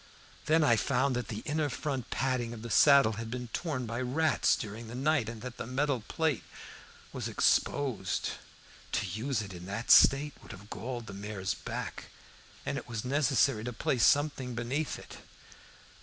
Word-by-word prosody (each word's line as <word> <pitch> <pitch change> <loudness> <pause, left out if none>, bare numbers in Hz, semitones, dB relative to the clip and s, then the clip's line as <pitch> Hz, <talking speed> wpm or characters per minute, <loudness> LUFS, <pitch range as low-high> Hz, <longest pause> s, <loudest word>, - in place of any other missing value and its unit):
Then 160 +1 +4
I 120 -6 +5
found 130 +4 +1
that 125 - -2
the 110 0 -5
inner 150 0 0
front 135 -1 -3
padding 125 -3 -1
of 110 - -10
the 115 - -6
saddle 140 -6 +6
had 115 - -6
been 125 0 -5
torn 140 -3 -3
by 115 +2 -3
rats 150 +6 +2
during 110 +2 -6
the 115 - -7
night, 135 -3 +1
and 115 -1 -8
that 125 -1 -7
the - - -5
metal 135 0 0
plate 160 -5 0 0.7
was - - -3
exposed. 125 -10 +1 0.6
To 105 - +1
use 110 +5 -2
it 95 -2 -9
in 90 0 -9
that 105 +4 -1
state 145 +1 +7
would - - -10
have 100 +2 -13
galled 120 +3 -5
the 100 - -8
mare's 100 -1 -3
back, - - -6 0.6
and - - -1
it - - -13
was 115 0 -4
necessary 135 -4 +2
to 125 +1 -4
place 120 +1 0
something 140 -4 +2
beneath 130 +6 -2
it. - - -11
125 Hz, 175 wpm, -31 LUFS, 110-140 Hz, 0.7 s, state